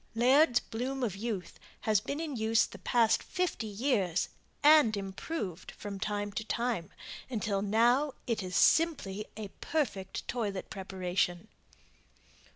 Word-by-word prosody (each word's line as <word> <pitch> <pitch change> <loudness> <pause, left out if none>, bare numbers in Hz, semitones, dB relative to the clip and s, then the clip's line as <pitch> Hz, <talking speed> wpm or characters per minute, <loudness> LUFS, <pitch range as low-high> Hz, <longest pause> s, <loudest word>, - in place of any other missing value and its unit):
Laird's 250 +2 +5
"Bloom 255 +3 -4
of 210 -6 -1
Youth" 200 -4 -4 0.2
has 215 -2 +2
been 280 +6 -4
in 315 -4 -3
use 225 0 +3
the - - -11
past 230 -2 +3
fifty 360 -11 -2
years 205 - 0 0.3
and 295 -8 +7
improved 195 - -5
from 200 -2 -6
time 205 0 -2
to 220 - -3
time, 235 -6 -1 0.4
until 210 -5 -1
now 240 +7 +3
it 230 -3 -1
is 185 -1 -5
simply 215 - +3
a 210 -2 -5
perfect 205 -12 -2
toilet 210 -6 -3
preparation. 185 0 -2
220 Hz, 130 wpm, -31 LUFS, 195-250 Hz, 0.4 s, and